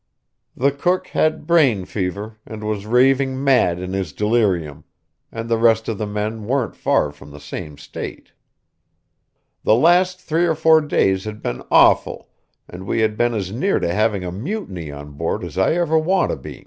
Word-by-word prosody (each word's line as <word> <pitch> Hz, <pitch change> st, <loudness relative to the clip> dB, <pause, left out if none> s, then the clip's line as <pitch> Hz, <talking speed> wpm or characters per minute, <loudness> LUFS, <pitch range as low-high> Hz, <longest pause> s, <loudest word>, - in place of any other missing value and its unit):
The 140 Hz, +3 st, +2 dB
cook 175 Hz, +7 st, -1 dB
had 155 Hz, -1 st, 0 dB
brain 140 Hz, -, +3 dB
fever, 105 Hz, +3 st, -4 dB
and 110 Hz, -1 st, -9 dB
was 105 Hz, -1 st, -3 dB
raving 130 Hz, +2 st, +2 dB
mad 125 Hz, -11 st, +3 dB
in 90 Hz, +1 st, -5 dB
his 95 Hz, -6 st, -3 dB
delirium; 100 Hz, -9 st, 0 dB, 0.5 s
and 115 Hz, 0 st, -6 dB
the 115 Hz, -1 st, 0 dB
rest 115 Hz, -1 st, +3 dB
of 110 Hz, -3 st, -3 dB
the 105 Hz, -, -2 dB
men 105 Hz, +1 st, -4 dB
weren't 130 Hz, -2 st, -1 dB
far 75 Hz, -, +1 dB
from 75 Hz, 0 st, -15 dB
the 75 Hz, 0 st, -11 dB
same 75 Hz, +1 st, -8 dB
state. 75 Hz, -, -8 dB, 1.3 s
The 110 Hz, -, +4 dB
last 180 Hz, +6 st, +3 dB
three 170 Hz, -1 st, 0 dB
or 165 Hz, -, +1 dB
four 160 Hz, 0 st, +5 dB
days 95 Hz, -10 st, +1 dB
had 110 Hz, 0 st, -7 dB
been -, -, -3 dB
awful, -, -, +3 dB, 0.4 s
and 95 Hz, +2 st, -10 dB
we 115 Hz, -, 0 dB
had 110 Hz, -1 st, +1 dB
been 120 Hz, +1 st, +1 dB
as 95 Hz, -3 st, -3 dB
near 145 Hz, -, 0 dB
to 85 Hz, -, -1 dB
having 105 Hz, -1 st, +1 dB
a 90 Hz, -, -4 dB
mutiny 100 Hz, -, -5 dB
on 70 Hz, 0 st, -9 dB
board 80 Hz, +3 st, -3 dB
as -, -, -7 dB
I 95 Hz, +8 st, +2 dB
ever 165 Hz, -2 st, +2 dB
want 185 Hz, +5 st, +1 dB
to -, -, -1 dB
be. -, -, -10 dB
110 Hz, 185 wpm, -20 LUFS, 95-140 Hz, 1.3 s, four